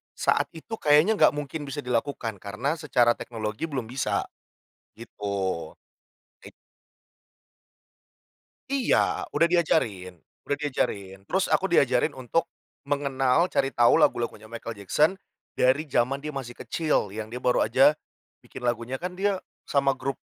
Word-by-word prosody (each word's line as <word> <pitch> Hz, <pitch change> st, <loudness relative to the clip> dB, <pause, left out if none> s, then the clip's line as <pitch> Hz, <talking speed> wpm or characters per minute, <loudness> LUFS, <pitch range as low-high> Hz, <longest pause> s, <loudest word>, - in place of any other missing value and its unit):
saat -, -, +2 dB
itu 220 Hz, +8 st, -7 dB
kayaknya 150 Hz, +9 st, +5 dB
nggak -, -, +5 dB
mungkin 145 Hz, +1 st, -5 dB
bisa 140 Hz, +1 st, -5 dB
dilakukan, 120 Hz, -3 st, -2 dB
karena 120 Hz, -, -3 dB
secara 125 Hz, -6 st, +2 dB
teknologi 110 Hz, +3 st, -4 dB
belum 135 Hz, -7 st, -4 dB
bisa, 130 Hz, +1 st, -1 dB, 0.7 s
gitu. 115 Hz, -2 st, -12 dB, 1.2 s
Eit -, -, -12 dB, 2.2 s
Iya, 275 Hz, -3 st, +1 dB
udah 170 Hz, -, +4 dB
diajarin 110 Hz, -, +1 dB, 0.3 s
udah 145 Hz, 0 st, -2 dB
diajarin, 100 Hz, -9 st, -2 dB
terus 190 Hz, -, 0 dB
aku 195 Hz, -1 st, +1 dB
diajarin 130 Hz, -2 st, +3 dB
untuk 130 Hz, +5 st, -1 dB, 0.4 s
mengenal 140 Hz, +2 st, +1 dB
cari 135 Hz, -6 st, 0 dB
tahu 120 Hz, -2 st, +5 dB
lagu-lagunya 115 Hz, -2 st, +1 dB
Michael 115 Hz, 0 st, -6 dB
Jackson 130 Hz, -, +2 dB, 0.4 s
dari 135 Hz, +5 st, +2 dB
zaman 130 Hz, +1 st, +1 dB
dia 150 Hz, 0 st, -6 dB
masih 130 Hz, -3 st, -5 dB
kecil, 120 Hz, -, -1 dB
yang 110 Hz, 0 st, -6 dB
dia 125 Hz, -, -5 dB
baru 125 Hz, 0 st, +2 dB
aja 135 Hz, +7 st, +5 dB, 0.5 s
bikin -, -, -10 dB
lagunya, 120 Hz, +1 st, -2 dB
kan 180 Hz, +1 st, -5 dB
dia 195 Hz, 0 st, 0 dB, 0.2 s
sama 140 Hz, -1 st, +1 dB
grup 135 Hz, +1 st, -4 dB
135 Hz, 130 wpm, -26 LUFS, 120-150 Hz, 2.2 s, kayaknya